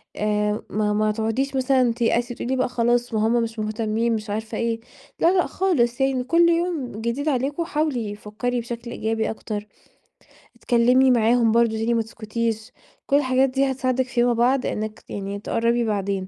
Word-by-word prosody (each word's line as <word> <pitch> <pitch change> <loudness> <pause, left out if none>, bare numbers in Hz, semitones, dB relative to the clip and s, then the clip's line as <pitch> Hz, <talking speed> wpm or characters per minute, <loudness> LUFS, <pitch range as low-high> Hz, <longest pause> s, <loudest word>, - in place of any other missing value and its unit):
آآ، 210 0 0
ما 210 0 0
ما 215 0 +2
تقعديش 225 +6 -1
مثلًا 255 -2 +2
تيأسي 240 +1 0
تقولي 255 +3 -2
بقى 255 -1 0
خلاص، 240 0 +1
ما 220 0 +2
همّ 235 +1 +2
مش 225 0 -5
مهتمين 220 +2 -1
مش 215 -1 -5
عارفة 215 +2 -4
إيه 230 -1 -1 0.4
لا، 335 - +4
لأ 360 - +3
خالص. 270 -10 0
يعني 270 -1 +1
كل 335 +5 +4
يوم 335 -6 0
جديد 240 +7 -1
عليكم 280 +4 -1
حاولي 280 -10 -1
فكري 230 +4 -3
بشكل 235 0 -6
إيجابي 220 -1 -1
أكتر، 215 -1 -5 0.9
أتكلمي 250 +2 +3
معاهم 230 -1 +3
برضو 235 0 +3
تاني 225 +2 0
ما 230 - +2
تسكتيش، 225 +1 -4 0.4
كل 280 - +2
الحاجات 265 -1 +2
دي 270 +1 +1
هتساعدِك 255 0 0
فيما 245 -2 +2
بعد 250 +3 +2
إنِك 215 0 -4
يعني 200 0 -5
تقربي 235 +3 0
بعدين 200 -3 -2
235 Hz, 165 wpm, -23 LUFS, 220-255 Hz, 0.9 s, لا